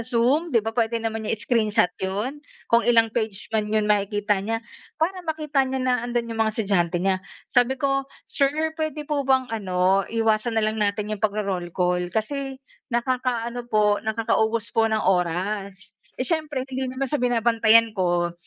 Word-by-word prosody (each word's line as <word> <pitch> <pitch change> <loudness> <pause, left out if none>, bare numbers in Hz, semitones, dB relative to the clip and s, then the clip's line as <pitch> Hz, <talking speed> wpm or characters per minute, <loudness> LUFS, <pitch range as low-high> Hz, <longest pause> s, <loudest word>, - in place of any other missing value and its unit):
Zoom, 255 +7 +2
'di 230 - +6
ba, 225 - -1
puwede 230 0 +1
naman 225 -1 -3
niya - - 0
i-screenshot 215 -4 +2
'yon. 210 +10 -3 0.3
Kung 235 0 +5
ilang 230 -2 +5
page 220 -4 -3
man 210 -1 0
'yon, 215 -1 +2
makikita 205 0 +1
niya. 225 +2 -2 0.4
Para 365 +3 0
makita 305 -3 0
niya 260 0 -2
na 255 -1 +2
'andon 240 -1 -2
'yong 225 - -4
mga 220 -1 +2
estudyante 180 -5 +1
niya. 190 -1 +1 0.4
Sabi 245 +2 +4
ko, 275 -1 +1 0.3
"Sir, 275 -1 +2 0.3
puwede 310 -1 -3
po 285 -2 0
bang 260 -1 +3
ano, 190 -2 +1
iwasan 225 0 +1
na 220 - +2
lang 215 0 -1
natin 205 0 0
'yong 215 - -5
pagro-roll 200 -4 -1
call 180 -1 +1
kasi 270 +4 -3 0.3
nakakaano 240 -1 -1
po, 210 -1 +3
nakakaubos 220 0 0
po 225 0 +5
ng 215 - +2
oras." 190 +2 -1 0.3
Eh, - - +1
siyempre 305 -6 -1
hindi 260 0 -3
naman 260 0 -2
sa 295 - +2
binabantayan 230 -1 +4
ko, 175 -2 +1
225 Hz, 170 wpm, -24 LUFS, 205-255 Hz, 0.4 s, di